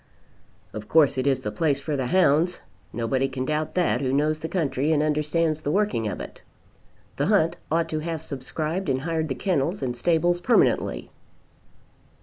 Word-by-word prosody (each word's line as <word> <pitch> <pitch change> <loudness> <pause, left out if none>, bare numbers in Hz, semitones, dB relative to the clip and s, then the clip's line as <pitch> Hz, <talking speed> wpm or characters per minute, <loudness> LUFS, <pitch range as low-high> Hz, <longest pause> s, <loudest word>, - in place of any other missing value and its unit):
"Of 110 0 -7
course 150 -4 +4
it 130 - 0
is 135 -2 +2
the 105 - -3
place 140 +5 0
for 145 +2 -3
the 130 -2 -1
hounds. 175 +1 +2 0.3
Nobody 130 +3 0
can 130 -1 -4
doubt 155 +2 -2
that 180 -5 +1
who 130 -2 0
knows 150 +3 +1
the 160 +1 -5
country 150 -4 0
and 150 -1 +2
understands 155 +1 0
the 145 - -3
working 195 - 0
of 105 - -4
it. - - -9 0.8
The - - 0
hunt - - +2
ought 165 +1 +1
to 155 - -2
have 160 0 -4
subscribed 155 +5 -4
and 130 -1 0
hired 160 +1 -1
the 130 - -3
kennels 180 0 -1
and 125 -2 -2
stables 175 +6 +1
permanently." 240 - +1
150 Hz, 175 wpm, -25 LUFS, 135-165 Hz, 0.8 s, course